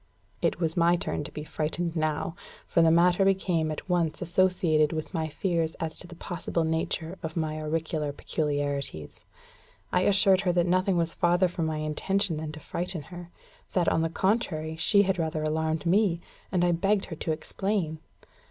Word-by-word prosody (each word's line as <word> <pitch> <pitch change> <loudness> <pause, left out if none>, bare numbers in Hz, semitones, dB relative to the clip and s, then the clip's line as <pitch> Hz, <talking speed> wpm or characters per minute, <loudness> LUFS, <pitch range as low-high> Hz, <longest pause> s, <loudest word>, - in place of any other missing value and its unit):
It - - +1
was 165 -2 0
my 170 0 +4
turn 170 - -3
to - - -7
be 150 - -6
frightened 165 +2 -2
now; 155 0 -1 0.3
for 170 - +3
the 165 - +6
matter 175 +3 +4
became 185 -4 +1
at 155 - -5
once 170 -4 0
associated 175 -3 +2
with 155 +3 -4
my 160 -2 -1
fears 165 0 -1
as 160 -1 -4
to 175 - -2
the 175 - -11
possible 170 -1 -3
nature 160 +2 -1
of 160 +1 -5
my 155 -1 -1
auricular 155 -1 -2
peculiarities. 145 - -3 0.7
I - - +3
assured 195 -1 +4
her 185 -3 +1
that 175 -1 +3
nothing 185 +1 +2
was 165 -1 0
farther 175 +2 +3
from 170 -2 -2
my 155 -1 -2
intention 165 +4 0
than 155 0 -4
to 155 - -8
frighten 175 +1 -3
her; 175 -1 -8 0.4
that, 180 -2 +3
on 160 - +1
the 165 - 0
contrary, 165 -4 0
she 200 +5 +4
had 190 -2 0
rather 160 -1 -1
alarmed 160 +1 -1
me; 180 -1 +3 0.3
and 180 -2 +2
I 175 - +3
begged 195 +4 +1
her 165 - -7
to 160 - -2
explain. 165 0 -2
165 Hz, 180 wpm, -27 LUFS, 155-180 Hz, 0.7 s, the